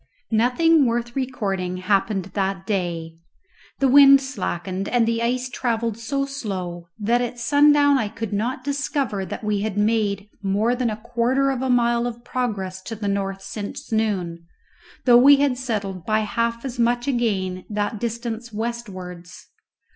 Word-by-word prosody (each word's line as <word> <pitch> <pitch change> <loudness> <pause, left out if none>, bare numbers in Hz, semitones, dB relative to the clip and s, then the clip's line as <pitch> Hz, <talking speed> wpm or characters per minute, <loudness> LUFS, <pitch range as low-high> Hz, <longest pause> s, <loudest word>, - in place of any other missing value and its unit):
Nothing 260 +7 +4
worth 235 0 -2
recording 195 -9 -2
happened 195 0 0
that 195 -1 -1
day. 170 -5 -3 0.6
The 275 - +2
wind 275 +1 +8
slackened, 195 -7 -4
and 240 -2 +2
the 230 0 0
ice 250 +2 0
travelled 235 -3 -1
so 275 +5 -2
slow 185 -10 -5
that 230 +3 +1
at 245 0 -3
sundown 285 +2 +4
I 220 - 0
could 225 0 -5
not 240 +5 -2
discover 275 -7 -2
that - - -6
we 210 -1 0
had 210 -1 -3
made 210 -2 +1
more 205 +4 +1
than 250 -1 0
a 215 - -4
quarter 245 +4 +1
of 260 -2 -3
a 265 - -1
mile 240 -1 +2
of 235 0 -7
progress 200 -8 -3
to 225 - -4
the 210 -1 -4
north 195 -1 -2
since 205 +2 -7
noon, 185 -7 -1 0.6
though 240 -2 +7
we 280 +3 +8
had 280 -2 +2
settled 205 -8 -3
by 215 +3 +1
half 230 +3 -2
as 250 -2 -5
much 240 +2 +1
again 195 -8 -1
that 210 0 -2
distance 235 0 -4
westwards. 195 -6 -6
230 Hz, 155 wpm, -23 LUFS, 200-245 Hz, 0.6 s, wind